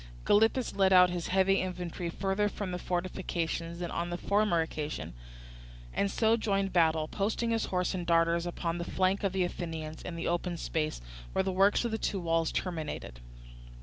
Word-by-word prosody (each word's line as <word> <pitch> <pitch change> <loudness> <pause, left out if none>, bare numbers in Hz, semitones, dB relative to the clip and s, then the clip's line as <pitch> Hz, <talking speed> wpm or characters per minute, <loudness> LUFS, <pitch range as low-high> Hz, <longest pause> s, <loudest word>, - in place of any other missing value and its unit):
Gylippus 225 +4 +3
led 195 -1 +4
out 180 -1 +7
his 175 -2 -3
heavy 190 +1 +3
infantry 180 -2 -4
further 195 +3 0
from 200 -2 -5
the 180 - -3
fortifications 175 -2 -2
than 175 -1 -4
on 170 +1 -2
the 175 - -3
former 200 -3 +2
occasion, 155 - -4 0.8
and 200 - +1
so 220 +2 +3
joined 195 -4 0
battle; 160 -3 +3
posting 220 +5 -1
his 225 -1 +1
horse 180 0 -1
and 180 -2 -3
darters 170 0 +3
upon 170 0 -3
the - - -2
flank 185 +3 0
of 195 - +1
the 190 0 +1
Athenians 160 -3 -5
in 180 - -6
the 165 - -3
open 175 0 -1
space, 155 - -2 0.3
where - - +2
the 190 - -1
works 195 +5 +3
of 235 - -1
the 220 - -2
two 200 - -1
walls 165 -2 +1
terminated. 160 - -4
180 Hz, 180 wpm, -30 LUFS, 170-195 Hz, 0.8 s, out